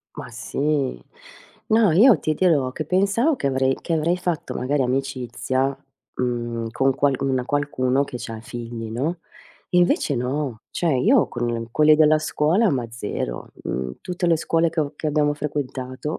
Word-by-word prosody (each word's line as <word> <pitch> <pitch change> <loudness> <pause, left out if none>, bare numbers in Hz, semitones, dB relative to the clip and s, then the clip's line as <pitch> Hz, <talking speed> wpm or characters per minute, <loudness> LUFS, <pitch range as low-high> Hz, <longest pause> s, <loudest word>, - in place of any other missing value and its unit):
Ma 140 -4 -7
sì. 140 +3 -2 0.7
No, 220 -5 +4
io 225 +7 +6
ti 155 - -1
dirò, 145 -9 +2
che 155 - -4
pensavo 200 - +2
che 140 - -3
avrei 130 0 +1
che 170 - -4
avrei 165 +3 +1
fatto 175 -3 -3
magari 135 +2 0
amicizia, 130 +1 -1 0.4
mhmm, 120 -2 -2
con 135 +1 +2
qual 140 -1 +2
una 130 -2 0
qualcuno 140 -2 0
che 130 - -6
c'ha 115 -1 -7
figli, 115 -1 -7
no? 155 +9 -2 0.5
Invece 175 -5 +2
no. 125 -2 -3
Cioè, 160 -7 0
io 230 - +4
con 120 -1 -3
quelli 155 +3 +5
della 155 0 +5
scuola 165 +8 +2
ma 120 -5 -2
0. 105 - -5
Mhmm, 65 0 -3
tutte 180 -1 -3
le 165 -1 +4
scuole 165 +1 +1
che 160 0 -2
ho 145 0 -2
che 155 - -4
abbiamo 150 -1 +2
frequentato, 140 -1 -4
140 Hz, 160 wpm, -23 LUFS, 125-160 Hz, 0.7 s, io